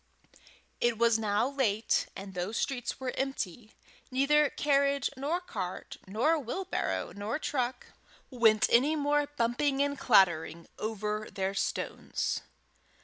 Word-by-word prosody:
It 240 -2 +1
was 230 0 +4
now 215 +2 +1
late, 235 -6 +1
and 195 0 -8
those 180 +5 -3
streets 250 -2 -2
were 260 -1 -3
empty; 240 -5 -4 0.3
neither 280 +3 +3
carriage 280 -2 +1
nor 290 +7 -1
cart, 185 - -6
wheelbarrow 300 - -1
nor 205 +7 -2
truck, 255 -5 -2 0.5
went 225 -4 +4
any 275 +7 +4
more 290 0 +1
bumping 275 +1 0
and 285 -1 -2
clattering 170 -6 +3
over 215 0 -3
their 195 -1 -2
stones. 195 - -2
240 Hz, 115 wpm, -30 LUFS, 210-280 Hz, 0.5 s, was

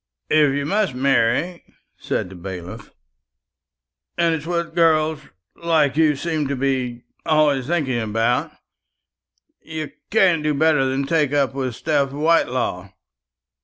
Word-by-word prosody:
"If 150 -3 +4
you 140 0 -2
must 195 -4 0
marry," 135 +6 +1 0.3
said - - -3
the - - -10
bailiff, 90 -1 -8 1.3
"and 170 -1 +2
it's 160 0 -4
what 170 -1 -2
girls 160 -2 +2 0.4
like 160 -5 +1
you 155 -1 +3
seem 155 0 -2
to 140 - -2
be 130 -2 -2 0.2
always 145 -4 +2
thinking 145 -8 0
about, 115 +2 0 1.1
you 155 -1 -6 0.2
can't 185 -6 +3
do 150 -1 0
better 150 -2 +3
than 135 +1 -1
take 150 -2 +1
up 140 -2 +1
with 130 -3 -3
Steph 140 -1 0
Whitelaw. 130 - 0
145 Hz, 130 wpm, -21 LUFS, 130-160 Hz, 1.3 s, If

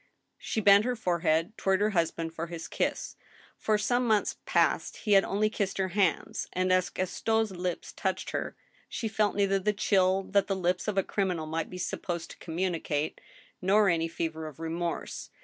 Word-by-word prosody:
She 220 - -2
bent 200 0 +7
her 250 +1 0
forehead 170 -1 0
toward 190 -1 +2
her 210 +1 +2
husband 165 -2 -1
for 165 +1 -4
his 165 -1 -6
kiss; - - -2 0.4
for 215 -1 +1
some 245 +4 +1
months 215 -2 +2
past - - +2
he 215 - -3
had 195 -1 +7
only 205 +2 +1
kissed 205 -3 -2
her 190 -1 0
hands, 190 -1 0
and 185 0 +2
as 185 +1 +2
Gaston's 220 +4 0
lips 180 -1 -4
touched - - -2
her - - -3 0.3
she 230 - -3
felt 215 -1 +1
neither 195 -1 +2
the 210 +2 +1
chill 190 -2 +2
that 200 0 +3
the 195 - 0
lips 180 +1 0
of 210 -2 -1
a 195 - +4
criminal 180 -6 -1
might 160 +1 -3
be 180 - -7
supposed 175 -1 -4
to - - -12
communicate, 165 -3 -2 0.4
nor 200 +2 +4
any 165 -1 +1
fever 160 -1 -4
of 150 -2 -11
remorse. 165 +1 -4
185 Hz, 185 wpm, -29 LUFS, 170-205 Hz, 0.4 s, bent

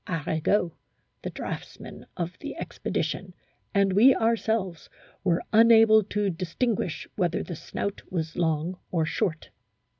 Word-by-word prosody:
Arago 165 +2 0 0.5
(the - - -4
draughtsman - - -7
of 175 +1 -3
the - - -7
expedition) - - -3 0.4
and 200 -2 +2
we 240 +7 +7
ourselves 220 -6 0 0.3
were 175 -2 +1
unable 225 -1 +7
to 210 +1 -1
distinguish 180 +2 -2
whether 175 -4 0
the 175 - -6
snout 200 +5 -4
was 160 -3 -3
long 165 +1 -1
or 165 -3 +1
short." 160 0 -2
185 Hz, 120 wpm, -27 LUFS, 165-215 Hz, 0.5 s, we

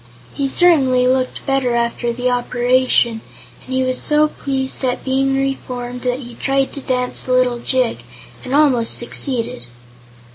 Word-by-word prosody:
He 275 - -1
certainly 265 -5 +4
looked 255 0 -1
better 270 -3 0
after 235 0 -1
the 245 +1 -2
operation, 245 -1 +1 0.4
and - - -12
he 260 0 +1
was 255 0 -1
so 300 0 +2
pleased 265 -2 -3
at 250 -1 -1
being 270 0 +1
reformed 250 -2 -4
that 250 +1 -2
he 240 -1 -10
tried 270 +2 -1
to 280 - -5
dance 250 -1 -1
a 255 - +1
little 250 -1 +2
jig, 250 - 0 0.4
and 260 +2 -2
almost 265 -6 +3
succeeded. 240 - -2
255 Hz, 150 wpm, -18 LUFS, 245-270 Hz, 0.4 s, certainly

